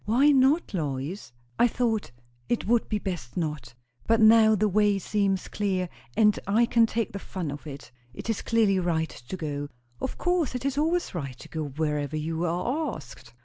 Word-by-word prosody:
"Why 250 +7 +4
not, 275 +2 +3
Lois?" 150 - -3 0.3
"I 240 - +6
thought 230 -2 -1 0.4
it 240 - 0
would 235 +1 +2
be 215 - +1
best 175 -12 -5
not. 150 -8 -3 0.3
But 225 0 +4
now 220 0 +7
the 215 +1 +2
way 205 0 +3
seems 195 -1 0
clear, 185 -3 -1 0.3
and 210 -2 +4
I 220 +4 +4
can 230 -1 +4
take 230 -1 -2
the 200 - -4
fun 180 -6 -5
of 145 +2 -8
it. 140 -1 -9 0.2
It 125 - -9
is 225 -2 -1
clearly 215 -4 +2
right 165 -3 0
to 125 +10 -8
go." 145 -4 -4 0.3
"Of 265 - -3
course! 355 -7 0
It 250 +1 -4
is 275 -1 0
always 325 +4 0
right 135 -8 -5
to - - -12
go 160 -1 -3
wherever 150 +1 -2
you 160 +2 -2
are 245 - -1
asked." 125 -4 -12
195 Hz, 190 wpm, -27 LUFS, 155-230 Hz, 0.4 s, now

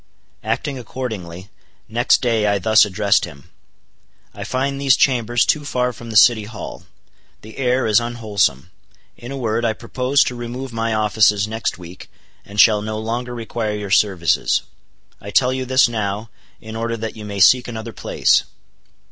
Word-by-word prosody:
Acting 140 -3 -2
accordingly, 105 -7 -7 0.4
next 120 +4 +2
day 115 -3 +1
I 100 - +1
thus 110 +3 +4
addressed 100 +1 +1
him: 70 -6 -14 0.8
"I - - -7
find 135 +2 -2
these 135 -2 +4
chambers 120 -4 +2
too 150 - +1
far 125 -3 -1
from 115 +1 -11
the 110 - -6
City 110 0 +5
Hall; 105 0 -9 0.6
the 110 +1 -12
air 125 0 +1
is 110 -1 +4
unwholesome. 105 - -1 0.4
In 120 +2 -10
a 140 - -5
word, 115 -2 -1
I 115 -2 +1
propose 130 +5 +1
to - - -3
remove 120 +1 -6
my 115 -1 -1
offices 105 -1 +2
next 110 -3 -3
week, 90 +1 -12 0.3
and 105 +1 -8
shall 105 -1 +6
no 110 +1 -4
longer 120 +3 -4
require 115 -2 -3
your 105 -2 -6
services. 95 -5 +2 0.6
I 100 - -8
tell 125 +4 +2
you 130 0 -3
this 130 0 +4
now, 110 -1 -4 0.3
in 110 0 -9
order 115 +1 -3
that 110 0 -5
you 110 - -9
may 100 -1 -6
seek 125 +6 +5
another 115 -1 -7
place." - - +2
115 Hz, 165 wpm, -19 LUFS, 105-125 Hz, 0.8 s, shall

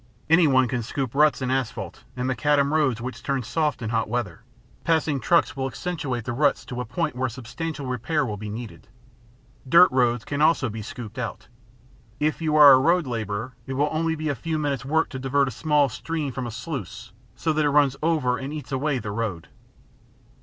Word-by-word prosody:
Anyone 140 -7 +5
can 125 0 -2
scoop 125 +2 -3
ruts 150 -1 +3
in 130 - -1
asphalt 115 -8 -3
and 125 0 -1
macadam 140 +2 +2
roads 130 -7 +1
which 125 +1 -6
turn 135 -2 -1
soft 150 +1 -1
in 110 - -3
hot 115 -2 0
weather; 120 -1 -3 0.4
passing 160 -4 +1
trucks 170 +3 +2
will 135 -1 -2
accentuate 130 -3 -4
the 120 - -3
ruts 145 +3 +1
to 125 0 -5
a - - -4
point 110 - -2
where 130 0 -1
substantial 135 +5 -6
repair 130 +4 -1
will 105 -4 -3
be 105 +1 -7
needed. 110 +1 -8 0.8
Dirt 170 +5 +7
roads 120 -3 +1 0.2
also 155 -5 +3
can - - -8
be 110 - -5
scooped 110 +2 -8
out. 115 -2 -5 0.7
If 155 +2 0
you 155 -1 0
are 145 -2 +10
a 130 - +7
road 170 +4 +3
laborer, 115 0 -4
it 135 - -3
will 145 +3 +1
be - - -4
only 160 -1 -1
a 145 - +1
few 160 +6 -3
minutes 140 -4 -1
work 160 +4 +1
to 130 - -6
divert 135 +1 +1
a - - -3
small 150 +3 +2
stream 150 +3 -4
from 125 0 -4
a - - -5
sluice 115 - -6 0.2
so 160 - 0
that 155 0 +1
it 145 - +3
runs 145 -2 +3
over 150 -6 +1
and 135 +1 -5
eats 150 -1 -7
away 135 +1 0
the 105 -4 -5
road. 100 -6 -4
130 Hz, 205 wpm, -24 LUFS, 120-150 Hz, 0.8 s, are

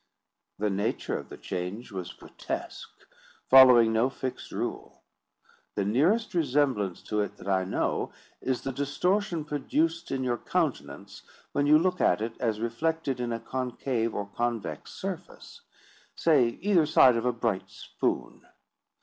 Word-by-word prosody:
The 105 0 0
nature 100 +3 -1
of - - -6
the - - -9
change 95 +6 -5
was 95 -3 -5
grotesque, - - -7 0.5
following 125 -4 +8
no 115 +4 +3
fixed 130 -1 -6
rule. - - -5 0.7
The 100 - 0
nearest 160 - +2
resemblance 135 - +1
to 105 0 -1
it 105 - -4
that - - -11
I 95 -1 +1
know, 95 - -1 0.3
is 130 -1 -2
the 135 - -2
distortion 165 +6 0
produced 160 +3 -1
in 135 -1 -2
your 120 -2 -1
countenance 100 - -3 0.3
when 145 0 +1
you 150 +1 +7
look 180 +2 0
at 90 - +3
it 115 +1 -4
as 110 -3 -1
reflected 135 +4 -1
in 120 -1 -2
a 115 - -2
concave 125 -1 -2
or 100 - -2
convex 115 +2 -3
surface—say, 145 -7 -2
either 180 -6 +3
side 130 -5 +6
of 115 +1 -1
a - - +3
bright 115 -5 -2
spoon. - - -4
125 Hz, 140 wpm, -28 LUFS, 110-150 Hz, 0.7 s, following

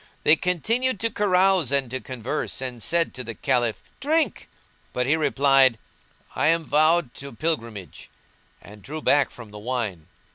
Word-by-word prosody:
They 155 - +6
continued 220 - 0
to 230 0 0
carouse 190 - +2
and 140 -2 +2
to 130 - -2
converse 130 +3 -4
and 125 -3 -5
said 170 +4 0
to 125 - -6
the 115 -1 -7
Caliph, 120 -4 0 0.2
"Drink!" 310 +4 0 0.4
but 125 - 0
he 145 +5 +3
replied, 135 -4 +3 0.6
"I - - +1
am 165 +1 +2
vowed 155 -2 +2
to 140 0 -8
Pilgrimage;"[FN#175] 115 - -4 0.6
and 105 +1 -13
drew 155 +6 -7
back 145 -2 +3
from 115 -4 -12
the 105 - -9
wine. 105 -8 -4
140 Hz, 155 wpm, -24 LUFS, 120-165 Hz, 0.6 s, They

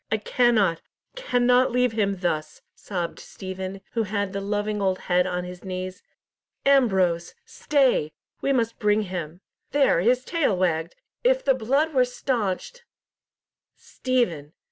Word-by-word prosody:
"I 220 - +3
cannot, 215 -6 +2 0.3
cannot 250 - +3
leave 250 0 +2
him 200 -4 -1
thus," 155 -3 -2
sobbed 175 -4 -5
Stephen, 190 0 -7
who 230 - 0
had 205 -2 -2
the 200 - -3
loving 205 +1 -2
old 190 -1 +1
head 180 0 +1
on 180 -1 -2
his 180 0 -9
knees. 185 0 -5 0.6
"Ambrose! 190 -11 +3
stay, 270 - +1 0.3
we 275 - +1
must 230 -4 0
bring 210 0 +2
him. 175 -2 -6 0.3
There, 280 -11 +3
his 250 +6 +2
tail 310 - +1
wagged! 170 -2 0 0.3
If - - +2
the 270 - +5
blood 275 +6 +1
were 255 -2 +5
staunched—" 245 - -3 0.9
"Stephen! 175 - -2
205 Hz, 135 wpm, -25 LUFS, 185-250 Hz, 0.9 s, the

